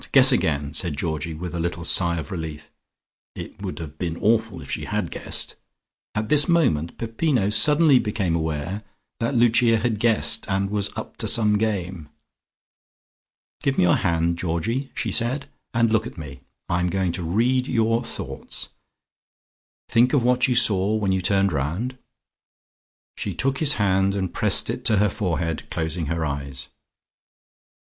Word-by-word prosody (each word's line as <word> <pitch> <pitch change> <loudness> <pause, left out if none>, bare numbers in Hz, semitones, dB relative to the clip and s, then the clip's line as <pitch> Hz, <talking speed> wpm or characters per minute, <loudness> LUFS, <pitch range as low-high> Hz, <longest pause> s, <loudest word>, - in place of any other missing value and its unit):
Guess - - +7
again," 70 -2 0
said 80 -3 -2
Georgie, 80 0 -3
with 90 +3 -6
a 85 - -3
little 85 0 -3
sigh 85 0 +2
of 75 -2 -6
relief. 80 -4 -6 0.6
(It - - -9
would - - -5
have 80 -2 -8
been 85 -2 -3
awful 110 -3 +1
if 70 - -9
she - - -2
had - - -2
guessed.) - - -3 0.6
At 105 0 -1
this 145 +3 +3
moment 105 - +1
Peppino 115 -2 0
suddenly 145 +5 +5
became 100 -6 -1
aware 80 +5 -3 0.4
that 115 +3 -1
Lucia 115 -1 +4
had 110 -2 -1
guessed 115 -1 +2
and 100 0 0
was 105 -1 0
up - - -7
to - - -1
some 105 -2 +4
game. 90 -7 -2 1.5
"Give 135 -1 0
me - - +4
your 90 - +4
hand, 85 -1 0
Georgie," 95 - -2
she - - -2
said, 130 +4 0 0.2
"and 115 -1 +2
look 110 +1 +2
at - - -11
me. 70 -4 -8 0.3
I'm 90 +1 0
going 95 0 0
to 90 +1 -4
read 120 +9 +1
your 115 0 +1
thoughts. - - -7 1.2
Think 120 +4 +3
of 140 -5 +3
what 125 +1 +3
you 125 - +1
saw 105 -3 +3
when 100 -3 0
you 95 0 +1
turned 100 +1 +2
round." 85 - -3 1.2
She - - -3
took 135 0 -1
his 150 -2 +5
hand 95 -1 +2
and 95 -3 -2
pressed - - +3
it - - -4
to 110 - +3
her 105 +1 +3
forehead, 85 -5 -3
closing 80 0 -3
her 80 +1 -1
eyes. 70 -2 -5
95 Hz, 160 wpm, -23 LUFS, 85-115 Hz, 1.5 s, Guess